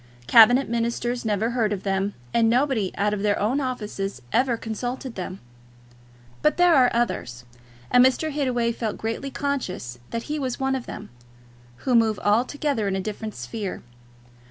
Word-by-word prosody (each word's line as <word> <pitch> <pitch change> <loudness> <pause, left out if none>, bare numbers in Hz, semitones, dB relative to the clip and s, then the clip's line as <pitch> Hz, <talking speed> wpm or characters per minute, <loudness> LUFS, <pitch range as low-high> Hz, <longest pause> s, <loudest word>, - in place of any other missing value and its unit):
Cabinet 245 - +7
ministers 235 +1 -2
never 215 +2 0
heard 230 -4 +1
of 200 -2 -3
them; 195 +1 -1 0.2
and 230 -1 +4
nobody 245 -5 +1
out 205 +1 +1
of 205 - -2
their 205 0 +2
own 250 +8 0
offices 210 - -4
ever 245 -1 +2
consulted 245 +3 -5
them. 185 -1 -6 1.0
But 300 - +2
there 355 -1 +5
are 255 -4 +6
others, 125 - -2 0.5
and 250 - +7
Mr. 265 +5 +2
Hittaway 250 -5 0
felt 225 -2 -3
greatly 225 +5 -3
conscious 190 - -3
that 230 0 -3
he 300 0 -3
was 260 -3 -3
one 265 0 0
of 260 -2 -3
them, - - -8 0.8
who 255 - +2
move 225 -3 +4
altogether 240 +2 0
in 195 - 0
a - - -1
different 215 +2 -5
sphere. 185 - -5
230 Hz, 160 wpm, -24 LUFS, 205-255 Hz, 1.0 s, Cabinet